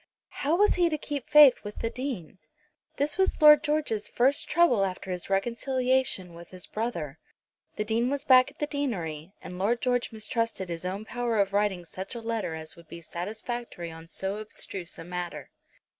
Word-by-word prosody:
How 295 +4 +2
was 415 +3 +4
he 350 -2 +3
to 310 - -1
keep 285 -3 -5
faith 295 -4 +8
with 205 0 -7
the 230 - -1
Dean? 240 - -5 0.6
This 290 +4 0
was 380 - +2
Lord 300 -1 +8
George's 295 -9 0
first 265 +4 +2
trouble 295 -11 +4
after 190 0 -3
his 180 +1 -4
reconciliation 240 -1 0
with 170 0 -12
his 185 -1 -6
brother. 170 - -4 0.6
The 210 - -1
Dean 230 +3 +1
was 285 +1 -2
back 255 -1 +7
at 285 - -21
the 295 - -1
deanery, 190 - -3
and 180 0 -8
Lord 225 +5 +1
George 245 -1 0
mistrusted 220 -3 -2
his 170 +1 -5
own 195 +4 -3
power 240 -1 -1
of 200 -1 +2
writing 200 -4 +1
such 190 +6 -7
a - - -4
letter 225 -7 -2
as 160 -1 -6
would 170 -1 -16
be 170 +1 -10
satisfactory 210 +1 -5
on 165 0 -11
so 190 +4 -3
abstruse 195 -4 -5
a 165 - -7
matter. 175 0 -6
220 Hz, 185 wpm, -28 LUFS, 180-260 Hz, 0.6 s, faith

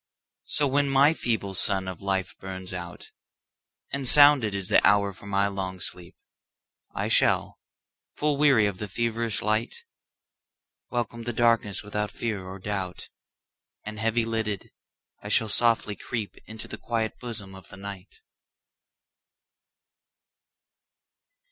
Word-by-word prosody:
So 150 - +3
when 140 +1 +1
my 140 +3 +5
feeble 110 -9 -2
sun 95 0 +1
of 95 -2 -6
life 95 -2 -1
burns 95 -1 -6
out, 90 -1 -8 0.8
And 140 -2 -2
sounded 145 -7 +7
is 95 -2 -2
the - - +4
hour 100 -1 +4
for 100 - -14
my 100 0 +2
long 95 -2 -4
sleep,I 90 0 -8
shall, - - +2 0.6
full 150 -1 +1
weary 140 -7 +4
of 100 -3 -2
the 105 - -4
feverish 115 +1 -2
light, 110 +2 -1 1.1
Welcome 120 -1 -3
the 120 - -2
darkness 115 -3 +2
without 105 0 -3
fear 105 -3 -4
or 95 +1 -8
doubt, 95 -2 -5 0.7
And 110 0 -7
heavy 115 +1 +1
lidded, 110 -3 -3 0.5
I 105 - -7
shall 110 +1 +3
softly 115 -1 +2
creepInto 110 0 -6
the - - -8
quiet 115 -2 -2
bosom 110 -6 -7
of 95 -2 -13
the - - -11
Night. 100 - -9
105 Hz, 125 wpm, -26 LUFS, 95-115 Hz, 1.1 s, sounded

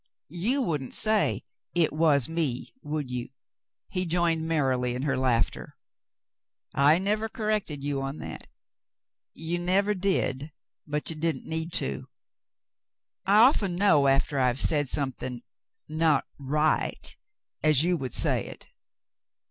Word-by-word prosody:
"You 220 - +2
wouldn't 150 - -3
say 215 -1 +2 0.3
'it 170 -4 +2
was 150 -5 +3
me,' 160 -7 -2
would 145 -3 -4
you 125 0 -4 0.3
?" - - -63
He 185 -1 -2
joined 165 -1 +1
merrily 130 -6 0
in 125 - -4
her 145 - 0
laughter. 125 -3 -1 1.0
"I 145 +3 +5
never 210 +4 -1
corrected 210 - -2
you 140 -1 -2
on 135 +2 -4
that." - - -8 0.9
"You 165 +2 -2
never 195 +4 +2
did, 175 -7 -1 0.4
but 150 +2 -1
you - - -5
didn't 155 -3 -2
need 160 +1 -2
to. 65 0 -2 1.2
I 205 +2 +6
often 215 -8 +4
know, 165 -7 +4
after 135 +1 +2
I've 125 0 +1
said 145 -3 +3
something 130 -3 -3 0.2
— - - -51
not 155 -2 +2
— - - -37
right 150 +3 0 0.2
— - - -44
as 155 -2 +4
you 180 +1 +2
would 130 -7 -4
say - - +3
it." - - -11
155 Hz, 140 wpm, -27 LUFS, 135-175 Hz, 1.2 s, I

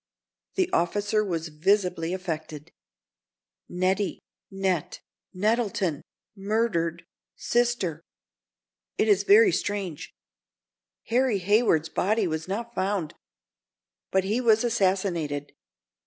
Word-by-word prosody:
The 375 -2 +2
officer 205 +4 +1
was 165 -5 -3
visibly 180 +1 +1
affected. 160 -4 -5 1.0
"'Nettie.' 185 +3 0 0.3
'Net—.' 190 -4 -2 0.3
'Nettleton!' 200 -6 0 0.3
'Murdered.' 195 -5 -1 0.3
'Sister.' 240 -10 0 1.0
It - - +2
is 410 - +4
very 410 0 +6
strange. 195 - -3 1.0
Harry 245 -2 +2
Hayward's 190 -5 +2
body 210 +5 +1
was 160 -1 -3
not 230 +5 -4
found, 190 -6 -1 1.0
but 190 0 +2
he 215 +6 0
was 225 -2 +4
assassinated. 185 -10 0
195 Hz, 90 wpm, -26 LUFS, 170-220 Hz, 1.0 s, very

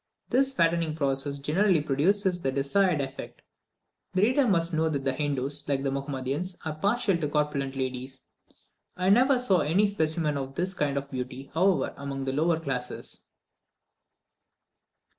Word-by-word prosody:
This 265 +2 +2
fattening 165 -2 +1
process 140 -1 0
generally 170 +6 +2
produces 175 +6 +1
the 135 - 0
desired 150 +5 +2
effect. 135 -1 -7 0.7
The 185 - +3
reader 255 +4 +3
must 170 -4 +2
know 160 0 +2
that 140 -3 -2
the 135 - +1
Hindoos, 145 0 -1
like 135 -1 0
the 135 - 0
Mahomedans, 140 +6 -3
are 160 - -2
partial 200 +4 +1
to 155 - -1
corpulent 145 -2 -1
ladies. 130 0 -4 0.7
I 185 +1 +1
never 255 +5 +5
saw 205 -8 +2
any 170 +8 +3
specimens 160 -6 0
of 135 0 -6
this 185 +2 -1
kind 145 -5 -1
of 140 0 -4
beauty, 130 +1 -6
however, 185 +3 +2
among 140 -1 -5
the 130 - -1
lower 160 +3 +2
classes. 130 -5 -4
150 Hz, 150 wpm, -27 LUFS, 135-185 Hz, 0.7 s, never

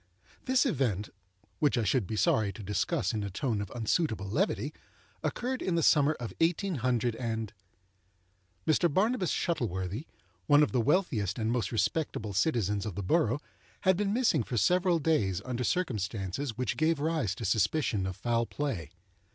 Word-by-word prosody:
This 260 +2 +3
event—which 115 - -2
I 120 - +2
should 105 0 +1
be 110 - -3
sorry 105 +1 +2
to 105 - -9
discuss 100 0 0
in 110 - -1
a 100 - -3
tone 105 +2 -1
of 100 - -5
unsuitable 110 - -1
levity—occurred 220 - -3
in 180 - 0
the 165 - +1
summer 145 0 +5
of 120 -6 -7
18—. 170 +1 +1 1.9
Mr. 160 +1 +3
Barnabas 200 - +1
Shuttleworthy—one 105 - 0
of - - +1
the 125 - +2
wealthiest 120 - +1
and 110 -1 0
most 120 -6 -1
respectable 110 -1 -1
citizens 105 - +1
of 100 - -5
the 100 - -3
borough—had 155 - 0
been 200 +2 0
missing 225 - +2
for 120 +2 -3
several 180 - +3
days 140 - +1
under 125 -1 -2
circumstances 115 - -2
which 125 - -1
gave 155 0 +2
rise 150 - 0
to 115 - -5
suspicion 110 - +1
of 95 - -4
foul 115 -1 0
play. 120 - -3
120 Hz, 145 wpm, -30 LUFS, 100-160 Hz, 1.9 s, summer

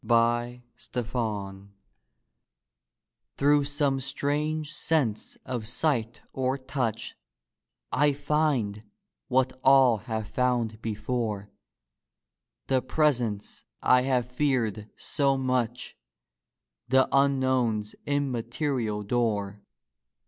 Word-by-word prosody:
DEATH 120 +1 +2 2.8
Through 145 +1 +4
some 145 -1 0
strange 150 +3 -1
sense 130 -10 0
of 120 -4 -4
sight 120 -3 -1
or 130 +1 0
touch 130 -4 -3 0.8
I 145 +1 +3
find 140 -8 0 0.5
what 130 0 +1
all 135 -3 +6
have 110 +1 -4
found 120 -2 0
before, 110 -2 -3 1.1
The 130 -1 +2
presence 125 -9 0 0.2
I 125 0 +5
have 125 -1 0
feared 120 -6 0
so 140 -2 +1
much, 125 -2 -1 0.9
The 130 +1 +4
unknown's 130 -6 +2
immaterial 125 -4 -1
door. 105 -3 -1
125 Hz, 80 wpm, -27 LUFS, 115-140 Hz, 2.8 s, all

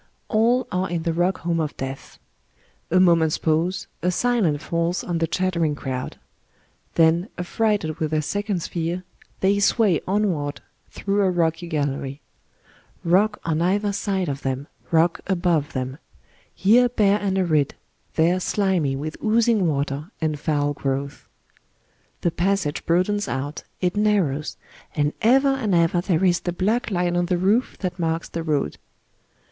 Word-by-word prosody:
All 235 +3 +3
are 185 -1 -1
in 170 -1 -2
the 165 -1 0
rock 175 +3 0
home 170 0 0
of 155 -2 -3
Death. 135 +1 -6 0.7
A 185 - +4
moment's 165 -4 +4
pause, 165 +4 0 0.2
a 180 - +1
silence 180 -8 +1
falls 170 +2 -1
on 170 -2 -2
the 165 - +1
chatter 180 0 0
ing 150 -2 +1
crowd. 130 -3 -5 0.8
Then, 165 +4 +3
affrighted 180 -3 -1
with 155 - 0
their 155 0 0
second's 205 0 -2
fear, 170 +2 -3 0.4
they 200 +1 +3
sway 200 -4 +3
onward 180 -8 0 0.3
through 200 0 -1
a 195 - +3
rocky 170 -1 0
gallery. 140 -3 -2 0.8
Rock 200 +5 +3
on 160 -1 0
either 200 +3 +1
side 195 -2 -1
of 140 0 -3
them, 135 +1 -2 0.2
rock 165 +1 +3
above 175 -6 +1
them 130 +2 -4 0.3
} - - -34
here 240 +5 +5
bare 205 -3 +3
and 195 -2 -1
arid, 155 -7 +1 0.4
there 170 +3 +3
slimy 185 -8 +1
with 155 +3 -5
oozing 220 -3 +3
water 145 +1 -2
and 155 -2 -1
fowl 145 -1 0
growths. 140 0 -3 0.9
The 175 - +1
passage 180 -3 -1
broadens 185 +5 +1
out, 145 +3 -4 0.2
it 180 +1 +1
narrows, 195 -9 +1 0.4
and 145 0 +1
ever 265 +5 +5
and 245 -8 +1
ever 170 +1 +3
there 180 0 +1
is 175 -2 +3
the 175 - -3
black 220 +9 0
line 175 -3 0
on 175 0 +1
the 180 - +1
roof 205 +8 +1
that 185 -2 -3
marks 165 0 -1
the 165 - -4
road. 150 - -1
175 Hz, 155 wpm, -23 LUFS, 155-195 Hz, 0.9 s, here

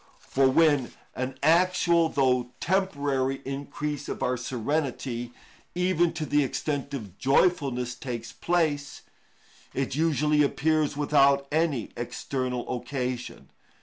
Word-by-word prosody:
For 135 0 +3
when 145 -3 +3 0.2
an 130 +1 -3
actual, 170 0 +4
though 140 -3 +1
only 125 -1 -6
temporary, 140 -8 0
increase 145 +1 -4
of - - -4
our 125 - +1
serenity, 125 -1 -2 0.4
even 180 -2 +2
to 160 -1 -3
the 145 0 +2
extent 140 +1 -3
of 100 -8 -8
joyfulness, 135 -4 +2
takes 120 -2 -6
place, 150 -1 -1 0.7
it 135 -1 -1
usually 150 0 +2
appears 150 0 +1
without 140 -1 +4
any 155 -6 0
external 125 +1 -3
occasion. 125 -1 -5
140 Hz, 115 wpm, -27 LUFS, 130-155 Hz, 0.7 s, actual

